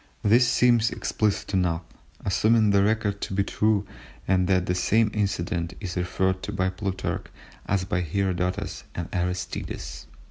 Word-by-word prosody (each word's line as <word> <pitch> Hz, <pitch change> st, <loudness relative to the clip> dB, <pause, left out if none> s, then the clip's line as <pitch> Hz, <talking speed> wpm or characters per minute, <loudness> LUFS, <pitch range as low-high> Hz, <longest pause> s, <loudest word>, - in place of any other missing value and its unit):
This 120 Hz, +4 st, +5 dB
seems 120 Hz, -1 st, +4 dB
explicit 105 Hz, -3 st, -1 dB
enough, 90 Hz, -3 st, +1 dB, 0.4 s
assuming 110 Hz, +2 st, +3 dB
the 100 Hz, 0 st, +4 dB
record 105 Hz, -1 st, 0 dB
to 95 Hz, -, -3 dB
be 100 Hz, -, +3 dB
true 105 Hz, 0 st, +1 dB, 0.4 s
and 90 Hz, -1 st, +3 dB
that 95 Hz, -2 st, +2 dB
the 90 Hz, -, 0 dB
same 110 Hz, +4 st, +2 dB
incident 85 Hz, -5 st, -1 dB
is 90 Hz, -5 st, -5 dB
referred 95 Hz, +1 st, 0 dB
to -, -, -4 dB
by 95 Hz, -2 st, 0 dB
Plutarch 95 Hz, 0 st, -3 dB, 0.4 s
as 95 Hz, -1 st, +1 dB
by 90 Hz, -1 st, 0 dB
Herodotus 90 Hz, +1 st, -1 dB
and 85 Hz, -2 st, -3 dB
Aristides. 85 Hz, -7 st, -3 dB
95 Hz, 145 wpm, -26 LUFS, 90-105 Hz, 0.4 s, This